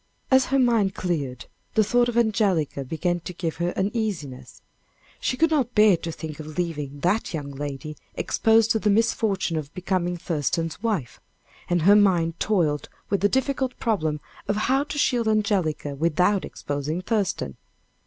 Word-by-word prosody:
As 260 0 +6
her 270 - +1
mind 230 -7 +3
cleared, 145 -9 -3 0.3
the 220 - +5
thought 240 +3 +2
of 235 - -2
Angelica 200 -11 +1
began 175 +5 -1
to 180 - -7
give 165 -2 -3
her 175 +1 0
uneasiness 190 - -3 0.6
she 255 - -1
could 325 +2 +3
not 260 -6 +1
bear 210 -3 +6
to 165 0 -5
think 155 -1 -7
of 155 0 -8
leaving 150 -5 -3
that 180 +2 0
young 145 -2 -5
lady 145 +2 -6 0.2
exposed 225 0 +3
to 220 - +2
the 210 - +1
misfortune 200 -5 +1
of 150 -1 -5
becoming 180 -1 -1
Thurston's 165 - -2
wife 205 - -2 0.5
and 175 -2 +1
her 200 +4 +7
mind 175 -5 +3
toiled 165 -9 +1 0.2
with 200 - +1
the 205 - +4
difficult 265 0 0
problem 160 -10 0 0.3
of 205 - +1
how 270 +2 +2
to 295 - -6
shield 245 -5 +2
Angelica 200 -9 0
without 170 +7 +1
exposing 145 +5 -4
Thurston. 195 - -1
180 Hz, 160 wpm, -24 LUFS, 155-220 Hz, 0.6 s, her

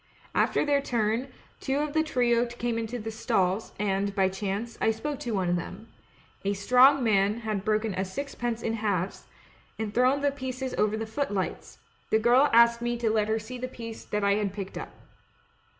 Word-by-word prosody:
After - - +2
their 285 -1 +2
turn, 230 -1 0 0.3
two 270 +1 -1
of 295 0 -1
the 315 - +3
trio 245 -5 +2
came 240 -1 -2
into 230 +2 -4
the 225 -1 -5
stalls, 215 -3 0
and, 200 0 -1
by 190 -2 +3
chance, 200 +4 -4
I - - +3
spoke 270 +6 -3
to 235 -3 -3
one 185 -2 0
of 175 0 +2
them; 195 +5 -7 0.5
a 200 +1 +1
Strong 250 +7 +5
Man 210 0 +2
had 215 -3 -2
broken 215 0 0
a 185 - -1
sixpence 240 +2 -4
in 225 - -1
halves, 200 -5 -2 0.5
and 220 -2 -4
thrown 255 +4 +3
the 285 0 +2
pieces 260 -1 -5
over 215 +1 +1
the 225 - -3
footlights 220 -5 -3 0.2
— - - -37
the - - +4
girl 245 +6 +4
asked 235 0 +5
me 240 0 -1
to 230 -2 0
let 215 -1 +1
her 220 0 +1
see 235 +3 -7
the 255 - -3
piece 230 -3 -8
that 210 0 -2
I 200 +1 +2
picked 195 0 -6
up. - - -5
225 Hz, 195 wpm, -27 LUFS, 205-250 Hz, 0.5 s, Strong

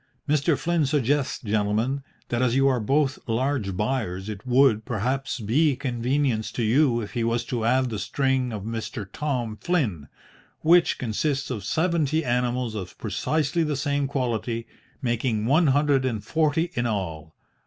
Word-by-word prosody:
Mr. 150 +1 +2
Flynn 170 -3 +1
suggests, 140 0 +1
gentlemen, 110 +5 0 0.3
that 120 0 0
as 125 -1 +2
you 135 0 +4
are 130 -2 +2
both 135 +4 +1
large 115 -5 -1
buyers, 105 -4 -2
it 105 +3 -7
would, 125 -3 +4
perhaps, 125 +5 -2
be 140 +8 +2
a - - -5
convenience 125 -2 -1
to 120 - -2
you 120 +1 +3
if 105 - -6
he 120 - -1
was 115 +1 0
to 120 -3 -2
add 125 +2 +2
the 105 - -3
string 130 -1 0
of 105 -3 -5
Mr. 115 0 -5
Tom 125 -7 -2
Flynn, 105 - -1 0.5
which 170 +1 +4
consists 135 +4 -1
of 110 -6 -4
seventy 160 - +1
animals 125 -1 0
of 95 -4 -6
precisely 140 - -1
the 150 -2 -1
same 140 0 0
quality, 120 -3 -2 0.4
making 120 -3 0
one 155 +7 +4
hundred 140 -1 +3
and 115 -6 -2
forty 160 +5 +1
in 120 -3 0
all. 80 -8 -4
125 Hz, 160 wpm, -25 LUFS, 110-140 Hz, 0.5 s, you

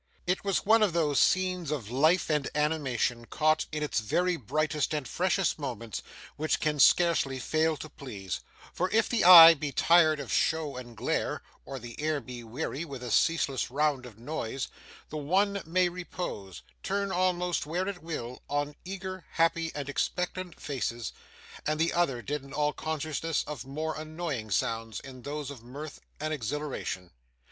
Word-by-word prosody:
It 180 +2 0
was 195 -2 0
one 220 +2 +5
of 205 -5 +3
those 150 -4 +2
scenes 185 -3 +2
of 125 -8 -3
life 155 +8 +3
and 150 -3 0
animation, 130 -7 0
caught 155 +5 +1
in 150 0 -2
its 150 - 0
very 175 - +1
brightest 155 +3 -1
and 145 -4 -3
freshest 185 - +1
moments, 115 -7 -4 0.4
which 155 +1 0
can 150 -1 0
scarcely 165 -4 +4
fail 155 +4 +1
to 155 - -7
please; 105 - -6 0.3
for 180 +2 0
if 225 +1 +3
the 240 - +1
eye 170 -2 +12
be 150 -2 -4
tired 160 0 +5
of 140 - -4
show 155 -4 +1
and 120 -2 -9
glare, - - -1 0.2
or 135 - -6
the 120 -1 -8
ear 155 -1 +1
be 125 -3 -8
weary 135 +6 -4
with 135 -6 -7
a 120 - -4
ceaseless 140 -1 +2
round 140 -1 0
of 110 -4 -14
noise, 125 0 -4 0.4
the 155 - -5
one 195 +7 +1
may 180 +2 +3
repose, 170 - -6 0.2
turn 200 -1 -1
almost 180 -3 0
where 180 +4 -1
it 200 -3 -4
will, 125 -7 -5
on 145 0 -1
eager, 190 -1 -6
happy, 165 0 +2
and 145 -2 -4
expectant 180 +4 -2
faces, 120 -5 -3 0.5
and 155 0 0
the 165 +1 +2
other 135 -9 +1
deaden 140 +2 -4
all 150 0 +1
consciousness 155 +1 -2
of 135 -4 -6
more 155 +3 -3
annoying 155 -7 -4
sounds 115 +1 -1
in 130 -2 -11
those 145 +1 -5
of 135 -5 -10
mirth 140 +6 -9 0.2
and 155 +1 -2
exhilaration. 130 - -4
150 Hz, 165 wpm, -29 LUFS, 130-170 Hz, 0.5 s, eye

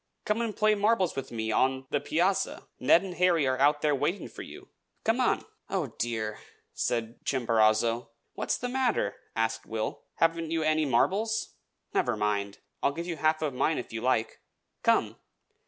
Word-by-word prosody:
Come 210 +2 +1
and 225 -3 -3
play 215 0 +4
marbles 205 -3 +2
with 135 - -5
me 110 -1 -2
on 130 +3 +1
the 145 - +2
piazza. 180 +7 0
Ned 165 +7 +5
and 190 -2 -5
Harry 175 -5 +4
are 130 0 0
out 145 +2 +3
there 150 -1 +3
waiting 145 +8 -1
for - - -10
you. - - -11 0.3
Come 225 +3 +2
on!" 250 - +1 0.2
"Oh, 165 - -2
dear!" 110 -2 -2 0.3
said 115 -1 -2
Chimborazo. 115 -2 +2 0.2
"What's - - -1
the 245 - -3
matter?" 250 -2 0 0.2
asked 115 0 -1
Will. 110 -1 -3
"Haven't 165 -1 +1
you 165 -1 0
any 155 0 +2
marbles? 205 - +1 0.4
Never - - +1
mind. 100 -1 -1 0.2
I'll 140 - +2
give 170 +3 -4
you 170 -2 -4
half 155 0 +2
of 145 -3 -1
mine, 155 +5 +1
if 120 - -6
you 115 - -3
like. 115 -3 0 0.4
Come!" - - +2
145 Hz, 170 wpm, -29 LUFS, 115-180 Hz, 0.4 s, Ned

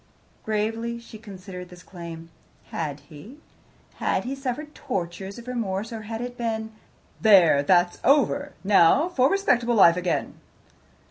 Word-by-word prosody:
Gravely 225 +2 -2
she 230 -2 -12
considered 190 -4 -10
this 180 0 -14
claim. 165 -2 -10 0.4
Had 150 -3 -4
he? 155 - -13 0.6
Had - - 0
he 255 +2 -4
suffered 275 +3 -5
tortures 190 -1 -5
of 235 +1 -11
remorse, 225 -3 -3
or 225 - -5
had 225 +2 -6
it 245 0 -5
been, 220 -1 -2 0.5
"There! 185 -9 +6
that's 175 +4 +2
over. 285 +1 +2
Now 200 - +4
for 265 -6 +3
respectable 245 -12 +2
life 175 -4 +6
again"? 180 -1 -2
215 Hz, 135 wpm, -25 LUFS, 180-240 Hz, 0.6 s, There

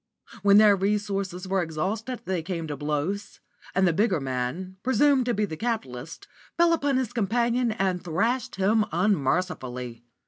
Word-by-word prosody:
When 200 +1 +6
their 210 -1 +7
resources 195 -2 -2
were 190 0 +1
exhausted 200 +10 -3
they 185 -3 -1
came 165 -1 -4
to 150 -2 -4
blows, 150 +8 -3 0.4
and 190 0 +4
the 170 - +2
bigger 195 -2 +2
man, 135 +8 -4
presumed 260 +2 +3
to 240 - +2
be 210 +1 +1
the 160 - -6
capitalist, 165 - -4 0.3
fell 340 0 +5
upon 285 -4 +1
his 260 -4 -2
companion 235 +2 +1
and 190 -4 -1
thrashed 225 +9 -1
him 210 +3 +3
unmercifully. 135 - -1
195 Hz, 150 wpm, -26 LUFS, 165-225 Hz, 0.4 s, their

